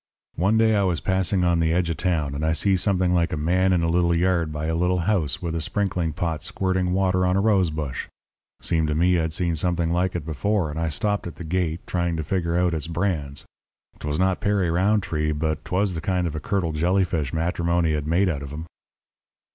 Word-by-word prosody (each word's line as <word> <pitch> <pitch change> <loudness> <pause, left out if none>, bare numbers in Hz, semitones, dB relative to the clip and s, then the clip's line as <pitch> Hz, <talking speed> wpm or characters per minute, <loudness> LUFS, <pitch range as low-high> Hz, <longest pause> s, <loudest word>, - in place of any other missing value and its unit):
"One 100 +6 +2
day 110 0 +4
I 100 - +3
was 90 -3 +1
passing 95 -1 +1
on 85 -1 +2
the 80 -1 +2
edge 85 0 +1
of 80 - -4
town, 80 -7 0
and 70 +2 -4
I 80 0 +2
see 95 +5 +2
something 95 -1 +1
like 85 -1 +1
a - - -2
man 90 +5 +2
in 90 -2 +2
a - - +1
little 85 0 +2
yard 85 -2 +1
by 75 0 -4
a 80 - -1
little 90 +2 +1
house 90 -2 0
with 85 -2 -2
a 80 - -2
sprinkling 90 -3 -1
pot 80 0 -3
squirting 95 -1 -1
water 95 -1 +2
on 90 0 +2
a - - +3
rose 100 -4 +3
bush. 75 -4 -4 0.6
Seemed 80 -2 +1
to 75 - -1
me, 90 +2 +3
I'd 80 -1 -1
seen 85 +1 0
something 85 0 0
like 90 +1 0
it 85 -4 -3
before, 85 +2 -1
and 75 - -5
I 80 -1 0
stopped 105 +4 -1
at 85 - -8
the - - -8
gate, 85 0 -2
trying 85 -2 -1
to 80 - -2
figure 85 0 -1
out 90 -1 +2
its 80 -1 -2
brands. 80 -5 -2 0.5
'Twas 75 0 -2
not 95 +1 +1
Perry 100 -4 +1
Rountree, 90 -5 +1
but 80 0 -2
'twas 95 +1 0
the 80 - -4
kind 90 +1 0
of 80 -3 -3
a - - -2
curdled 85 -2 -1
jellyfish 85 -4 +1
matrimony 85 0 0
had 75 -1 -2
made 90 +5 +2
out 75 -6 -2
of 70 - -7
him. 75 +3 -6
85 Hz, 225 wpm, -24 LUFS, 80-95 Hz, 0.6 s, day